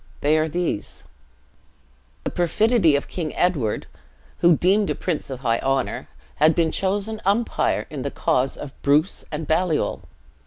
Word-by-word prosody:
They 150 +2 +3
are 155 - +1
these: 170 -10 -3 1.2
The - - -3
perfidy 180 -1 +3
of 140 - -1
King 160 -4 -4
Edward, 150 -12 0 0.5
who, 170 -2 +5
deemed 200 +3 +3
a - - 0
prince 170 -6 -3
of 130 -1 -6
high 115 -3 +1
honor, 135 -1 -1 0.3
had 155 +2 +4
been 165 -2 +2
chosen 205 +3 -1
umpire 210 +5 +1
in 145 -3 -5
the 140 - -2
cause 130 -1 0
of 145 -2 -8
Bruce 150 +6 +2
and 155 +1 -4
Baliol. 160 +1 0
160 Hz, 150 wpm, -23 LUFS, 140-185 Hz, 1.2 s, who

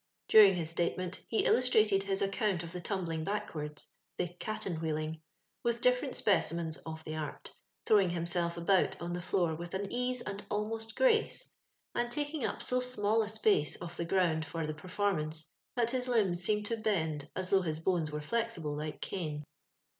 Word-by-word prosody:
During 205 -3 +8
his 165 -2 -2
statement, 175 +2 -1
he 225 - +1
illustrated 215 -5 +4
his 195 0 +2
ac 195 - 0
count 195 -6 0
of 170 - -7
the 180 0 -5
tumbling 170 -5 -2
backwards 160 -7 -4 0.2
— 175 - -53
the 175 - -1
" 175 - -33
caten 190 -6 -3
wheeling 155 0 -2
" - - -51
— - - -53
with 235 0 +1
different 250 +2 +2
specimens 170 -5 +2
of 160 0 -6
the 155 0 -5
art, 155 -1 -5 0.3
throwing 200 -4 +5
himself 170 0 -1
about 190 +2 +2
on 170 0 -4
the 175 - -3
floor 175 -2 +1
with 170 +3 -6
an 195 +1 -3
ease 250 0 0
and 205 -1 -5
almost 225 +2 -3
grace, 460 -3 +2 0.4
and 240 0 0
taking 290 +2 -2
up - - -2
so 250 - +2
small 225 -3 +1
a 215 - -2
space 210 -9 +2
of 175 0 -7
the 170 - -2
ground 165 -3 +2
for 165 0 -3
the 155 - -3
perform 185 +3 -1
ance, 155 0 -5 0.3
that 235 -1 +2
his 255 0 -1
limbs 200 -8 +2
seemed 210 +2 +1
to 230 +2 -1
bend 160 -9 -1
as 185 -1 -3
though 195 -1 +5
his 160 -3 -2
bones 165 -3 0
were 150 0 -3
flexible 175 -5 -2
like 150 0 -5
cane. 155 -6 -3
185 Hz, 195 wpm, -32 LUFS, 160-215 Hz, 0.4 s, During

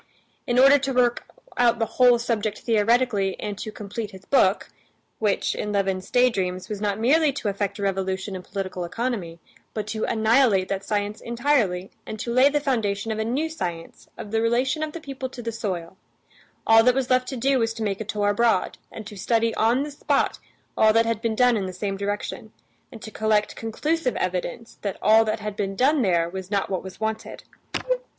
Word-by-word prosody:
In 240 -1 +1
order 275 +2 +7
to 270 0 -2
work 245 -1 +2 0.3
out 240 -1 +4
the 225 - +1
whole 245 +1 +4
subject 225 -3 -2
theoretically 225 -3 +2
and 210 -1 -4
to 215 - -5
complete 210 +1 -6
his 190 -1 -13
book, 200 -7 +2 0.5
which, 210 -3 +1
in 210 - -3
Levin's 195 -2 -1
daydreams, 190 -8 +1
was 210 -1 -4
not 205 -1 -1
merely 290 +6 +4
to 235 -6 -2
effect 200 0 -2
a 200 - -5
revolution 190 0 -2
in 185 - -5
political 185 -1 -5
economy, 185 -3 -3 0.4
but 215 -2 -2
to 215 +1 -4
annihilate 220 -3 +3
that 195 0 -2
science 205 +1 -2
entirely 235 -7 0 0.2
and 215 - -6
to 235 +2 -3
lay 260 +3 +6
the 295 +1 +1
foundation 225 -6 -1
of 220 - -3
a - - +1
new 260 +8 -1
science 175 - -6
of 205 - -8
the 225 0 +1
relation 250 +6 +1
of 310 -1 -3
the 335 - -6
people 270 -4 -6
to 245 -1 -9
the 230 - -2
soil, 190 -6 -4 0.7
all 225 0 +7
that 250 +1 +4
was 265 -1 -1
left 255 0 +3
to 265 - -4
do 265 +2 +2
was 225 -1 +1
to 225 - -4
make 200 -1 -2
a - - -1
tour 205 -1 -1
abroad, 230 +2 +1
and 220 - -8
to 210 0 -9
study 225 +3 +1
on 235 +5 +2
the 295 - -6
spot 285 - 0 0.4
all 220 - +5
that 225 +1 +3
had 230 -1 -1
been 230 -1 -1
done 245 0 +4
in 195 -3 -1
the 185 - -6
same 195 +2 -3
direction, 200 +1 -4 0.4
and 230 -4 -11
to 220 - -8
collect 215 -1 +1
conclusive 260 +5 -1
evidence 185 +5 -3
that 200 -3 -3
all 220 +2 +5
that 215 0 -2
had 210 -1 -4
been 195 -1 -2
done 275 +6 +3
there 170 -6 +2
was 190 +1 -7
not 200 -1 -1
what 185 - -1
was 190 -1 -10
wanted. 220 0 -4
220 Hz, 205 wpm, -24 LUFS, 200-245 Hz, 0.7 s, order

